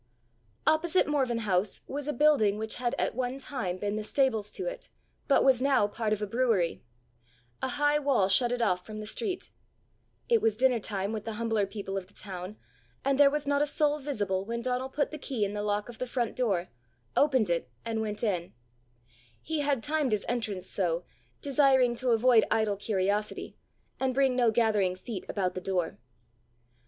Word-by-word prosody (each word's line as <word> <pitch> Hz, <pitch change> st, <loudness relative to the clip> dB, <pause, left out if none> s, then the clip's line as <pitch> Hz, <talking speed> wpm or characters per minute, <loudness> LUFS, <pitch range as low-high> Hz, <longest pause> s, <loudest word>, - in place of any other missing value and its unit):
Opposite 340 Hz, +3 st, +3 dB
Morven 270 Hz, -5 st, 0 dB
House 200 Hz, -3 st, 0 dB
was 285 Hz, +1 st, -5 dB
a -, -, +1 dB
building 245 Hz, -8 st, +3 dB
which 220 Hz, 0 st, -3 dB
had 245 Hz, -1 st, -1 dB
at -, -, 0 dB
one 255 Hz, +1 st, -2 dB
time 235 Hz, -10 st, -3 dB
been 205 Hz, +2 st, -2 dB
the 215 Hz, -, -3 dB
stables 220 Hz, -3 st, +1 dB
to 380 Hz, -, -5 dB
it, -, -, -5 dB, 0.4 s
but 280 Hz, -, +4 dB
was 260 Hz, -2 st, +4 dB
now 275 Hz, -5 st, +4 dB
part 215 Hz, +1 st, -2 dB
of 210 Hz, 0 st, 0 dB
a -, -, +1 dB
brewery; 215 Hz, -6 st, +1 dB, 0.8 s
a -, -, 0 dB
high 290 Hz, +3 st, +2 dB
wall 275 Hz, -9 st, +2 dB
shut 235 Hz, +5 st, +3 dB
it 245 Hz, -1 st, 0 dB
off 180 Hz, -4 st, +1 dB
from 215 Hz, +3 st, -8 dB
the 215 Hz, -, -6 dB
street; 370 Hz, -, -3 dB, 0.8 s
it 465 Hz, -2 st, +3 dB
was 220 Hz, -1 st, +1 dB
dinner 255 Hz, -1 st, +3 dB
time 200 Hz, 0 st, -2 dB
with 215 Hz, -2 st, -4 dB
the 225 Hz, -, -3 dB
humbler 220 Hz, -2 st, 0 dB
people 195 Hz, -1 st, -5 dB
of 185 Hz, -2 st, -5 dB
the 205 Hz, -, -24 dB
town, 190 Hz, +1 st, -7 dB, 0.5 s
and 275 Hz, 0 st, +2 dB
there 285 Hz, -1 st, +8 dB
was 295 Hz, 0 st, -2 dB
not 285 Hz, 0 st, +2 dB
a 295 Hz, -, +2 dB
soul 300 Hz, 0 st, +1 dB
visible, 205 Hz, -10 st, -1 dB
when 235 Hz, +3 st, -4 dB
Donal 255 Hz, +1 st, -1 dB
put 285 Hz, +1 st, -1 dB
the 310 Hz, -, -6 dB
key 245 Hz, -7 st, -1 dB
in 200 Hz, -, -4 dB
the 210 Hz, -, -2 dB
lock 205 Hz, 0 st, -1 dB
of 240 Hz, -2 st, -11 dB
the 255 Hz, -, -2 dB
front 245 Hz, -1 st, -2 dB
door, 195 Hz, -8 st, 0 dB, 0.5 s
opened 260 Hz, -10 st, +3 dB
it, 170 Hz, -, -1 dB, 0.2 s
and 225 Hz, -1 st, -1 dB
went 210 Hz, 0 st, -4 dB
in: 180 Hz, -6 st, -1 dB, 0.9 s
he 320 Hz, 0 st, -3 dB
had 280 Hz, -5 st, 0 dB
timed 295 Hz, -5 st, 0 dB
his 210 Hz, -, 0 dB
entrance 220 Hz, -6 st, -2 dB
so, 175 Hz, -3 st, 0 dB, 0.4 s
desiring 270 Hz, -3 st, +4 dB
to 250 Hz, +1 st, -1 dB
avoid 230 Hz, 0 st, +5 dB
idle 220 Hz, -2 st, +2 dB
curiosity, 205 Hz, +1 st, -1 dB, 0.4 s
and 260 Hz, -1 st, 0 dB
bring 270 Hz, -2 st, +3 dB
no 245 Hz, -2 st, +4 dB
gathering 210 Hz, -5 st, +2 dB
feet 190 Hz, +1 st, -7 dB
about 185 Hz, -3 st, -1 dB
the 185 Hz, +1 st, -4 dB
house. 165 Hz, -2 st, -2 dB
230 Hz, 190 wpm, -29 LUFS, 205-270 Hz, 0.9 s, there